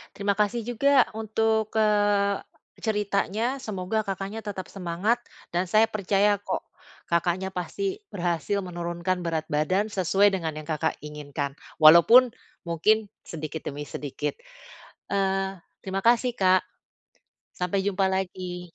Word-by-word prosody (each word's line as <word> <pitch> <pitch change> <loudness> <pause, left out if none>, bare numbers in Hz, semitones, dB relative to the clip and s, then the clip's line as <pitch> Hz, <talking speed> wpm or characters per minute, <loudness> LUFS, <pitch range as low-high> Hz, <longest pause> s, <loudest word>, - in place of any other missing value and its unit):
Terima 200 0 0
kasih 210 +3 +1
juga 265 +2 +4
untuk, 220 0 0
eee, 205 -2 +3 0.4
ceritanya, 210 +3 -1
semoga 215 -3 -3
Kakaknya 195 +2 -4
tetap 190 -3 -5
semangat 190 +5 -1 0.3
dan 175 +2 0
saya 215 +5 +3
percaya 205 0 +2
kok 195 -2 -3 0.5
Kakaknya 175 +2 0
pasti 375 - -3 0.2
berhasil 175 +2 -1
menurunkan 175 0 -3
berat 160 -2 -2
badan 175 +7 +1
sesuai 195 +2 +3
dengan 170 -5 -2
yang 155 -1 -8
Kakak 155 -2 -1
inginkan, 145 -1 -5 0.3
walaupun 170 +11 +8 0.4
mungkin 210 +6 +2 0.2
sedikit 155 -1 -6
demi 145 +1 -4
sedikit, 145 - -4 0.7
eee, 195 -1 0 0.2
terima 195 0 -2
kasih, 240 +2 +4
Kak. 185 -4 +3 0.9
Sampai 190 +2 -1
jumpa 195 -1 +1
lagi. 180 -2 -4
195 Hz, 120 wpm, -26 LUFS, 175-210 Hz, 0.9 s, walaupun